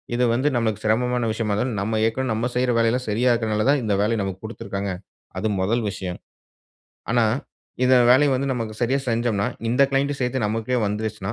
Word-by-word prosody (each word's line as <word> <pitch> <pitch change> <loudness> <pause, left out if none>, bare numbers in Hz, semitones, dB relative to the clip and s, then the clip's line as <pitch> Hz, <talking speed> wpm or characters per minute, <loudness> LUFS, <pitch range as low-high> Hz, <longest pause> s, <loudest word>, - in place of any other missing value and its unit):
இது 125 - +1
வந்து 130 +5 +1
நமக்கு 110 -3 -1
சிரமமான 125 +2 +1
விஷயமா 110 -1 -1
இருந்தாலும், 120 +1 -1
நம்ம 110 +2 -1
ஏற்கனவே 130 +4 -1
நம்ம 110 +2 -1
செய்ற 125 0 +2
வேலையெல்லாம் 115 +2 +1
சரியா 120 +5 +2
இருக்கிறனால 110 -2 0
தான், 145 0 +4
இந்த 105 -2 0
வேலைய 110 +2 +1
நமக்கு 95 -1 -4
குடுத்துருக்காங்க. 100 -3 -4 0.5
அது 110 - -1
முதல் 115 +5 +1
விஷயம். 95 -2 -5 0.9
ஆனா, 120 0 +3 0.6
இந்த 130 - +5 0.2
வேலைய 140 +3 +6
வந்து 135 +2 -1
நமக்கு 115 -3 -4
சரியா 130 +4 +2
செஞ்சம்ன்னா, 115 -3 0 0.2
இந்த 125 +3 +3
கிளையண்ட் 140 +1 +1
சேர்த்து 125 -1 -1
நமக்கே 115 +4 -1
வந்துருச்சுன்னா, 105 -1 -3
115 Hz, 175 wpm, -23 LUFS, 105-125 Hz, 0.9 s, வேலைய